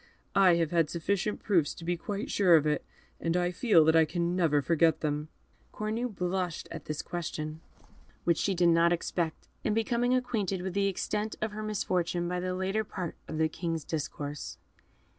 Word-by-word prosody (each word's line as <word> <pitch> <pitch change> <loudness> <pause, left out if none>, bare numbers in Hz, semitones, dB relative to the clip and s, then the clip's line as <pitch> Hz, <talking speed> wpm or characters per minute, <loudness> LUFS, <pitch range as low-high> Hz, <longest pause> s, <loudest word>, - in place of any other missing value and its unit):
I 190 -3 +6
have 165 -2 0
had 165 -3 +2
sufficient 200 +4 -1
proofs 170 -8 +2
to 165 - -9
be 175 +1 +1
quite 205 +7 -4
sure 185 -4 +5
of 155 -2 +4
it, 150 -1 +1 0.4
and 165 +1 0
I 175 0 +1
feel 180 - +4
that 160 +1 +4
I 165 - +7
can 170 +2 -1
never 165 -5 +3
forget 160 +1 +2
them." 150 0 -1 0.4
Cornue 220 +3 -2
blushed 180 -3 -2
at 165 -3 -7
this 155 -1 -4
question, 155 -2 -4 0.6
which 170 -2 +2
she 195 - +1
did 175 0 +4
not 170 0 +4
expect, 170 -1 -2 0.2
and 215 - +1
becoming 240 +2 +2
acquainted 210 -7 -1
with 190 -1 -3
the 200 +1 +2
extent 210 +3 -2
of 220 0 -2
her 215 +1 -6
misfortune 180 -5 -1
by 180 +1 -1
the 180 0 -2
latter 190 +4 0
part 185 -5 -5
of 155 - -5
the 160 0 +3
King's 165 -1 -3
discourse. 145 -1 -4
175 Hz, 185 wpm, -30 LUFS, 165-200 Hz, 0.6 s, I